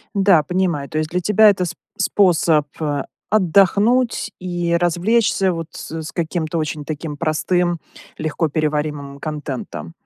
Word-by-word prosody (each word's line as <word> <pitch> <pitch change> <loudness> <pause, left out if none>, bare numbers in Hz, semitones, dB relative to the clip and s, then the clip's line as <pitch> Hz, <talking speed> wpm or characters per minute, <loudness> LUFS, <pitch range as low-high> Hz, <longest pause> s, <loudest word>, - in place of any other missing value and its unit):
Да, 195 -5 +5
понимаю. 170 -3 -1
То 155 - -3
есть, 155 0 -2
для 180 - 0
тебя 210 +3 +5
это 185 -2 0
сп 175 0 -5 0.2
способ, 165 -6 +3
э, 145 -3 -1 0.2
отдохнуть 205 +5 +3
и 175 -2 -1
развлечься, 190 +2 +2
вот, 165 -1 -5
с - - -8
с 155 +2 -8
каким-то 165 -1 -2
очень 150 -1 -3
таким 155 0 -5
простым, 175 +3 0 0.4
легкоперевариваемым 150 -2 -2
контентом. 150 0 -5
170 Hz, 130 wpm, -20 LUFS, 155-185 Hz, 0.4 s, Да